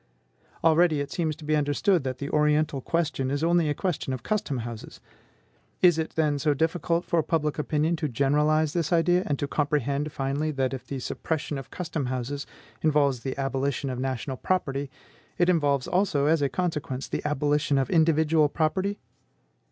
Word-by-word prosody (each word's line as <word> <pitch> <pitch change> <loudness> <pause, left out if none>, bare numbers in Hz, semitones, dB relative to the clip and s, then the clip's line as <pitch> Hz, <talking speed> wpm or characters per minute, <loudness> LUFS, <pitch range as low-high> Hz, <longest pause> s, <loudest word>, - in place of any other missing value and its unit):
Already 165 -1 +4
it 145 - -4
seems 160 -3 -1
to 150 - -12
be 155 +1 +2
understood 150 +4 +2
that 130 -1 -3
the 140 +1 -5
Oriental 150 -2 +2
question 155 -4 -1
is 145 +3 -1
only 170 -2 +3
a 145 - 0
question 165 -7 -2
of 125 -2 -5
custom 200 -10 -1
houses. 115 -2 -8 0.8
Is 175 -3 +6
it, 160 - -3
then, 150 -3 +1
so 150 +1 +2
difficult 165 +2 0
for 170 -2 +2
public 155 -1 -1
opinion 155 +2 +1
to 155 - -1
generalize 150 +4 +2
this 170 -2 -1
idea, 175 +1 +3
and 145 - 0
to 145 - -2
comprehend, 145 0 0
finally, 140 +3 -1
that 135 -1 -1
if 130 -1 -7
the 140 - -4
suppression 145 +2 -3
of 135 - -10
custom 160 -6 -3
houses 130 +3 -3 0.3
involves 145 -4 +2
the 130 +3 -5
abolition 135 0 -1
of 125 - -4
national 130 0 -3
property, 140 -6 -1 0.5
it 175 0 +3
involves 145 -6 +2
also, 180 -7 +1
as 155 0 +3
a 140 - +2
consequence, 145 -3 -3
the - - -3
abolition 150 0 +1
of 135 +4 0
individual 160 -2 +3
property? 185 +7 0
150 Hz, 175 wpm, -26 LUFS, 140-160 Hz, 0.8 s, Is